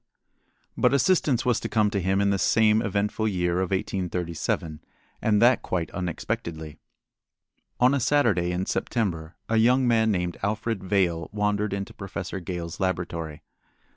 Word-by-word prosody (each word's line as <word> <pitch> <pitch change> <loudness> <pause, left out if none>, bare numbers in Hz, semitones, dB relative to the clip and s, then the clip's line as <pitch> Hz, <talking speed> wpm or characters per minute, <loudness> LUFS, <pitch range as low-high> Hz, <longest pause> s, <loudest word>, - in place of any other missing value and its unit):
But - - +3
assistance 140 -5 +2
was 125 -3 +2
to - - -5
come 105 -2 +2
to 100 -3 -1
him 95 +2 +1
in 100 0 +2
this 100 - 0
same 110 -1 +4
eventful 105 0 -1
year 90 -3 0
of 95 -1 -1
1837, 90 -4 -2 0.4
and 105 -2 +2
that 125 +1 +5
quite 85 -3 -3
unexpectedly. 80 -3 -4 1.0
On 125 +2 +5
a 140 - +2
Saturday 115 -10 +2
in 90 +1 -1
September 85 -11 -2
a 115 - +1
young 125 +3 +4
man 110 -2 +3
named 90 -4 -1
Alfred 110 0 -2
Vail 90 -4 0
wandered 105 0 0
into 100 0 -4
Professor 95 -1 -6
Gale's 85 -2 -6
laboratory. 85 -5 -3
100 Hz, 145 wpm, -25 LUFS, 90-110 Hz, 1.0 s, that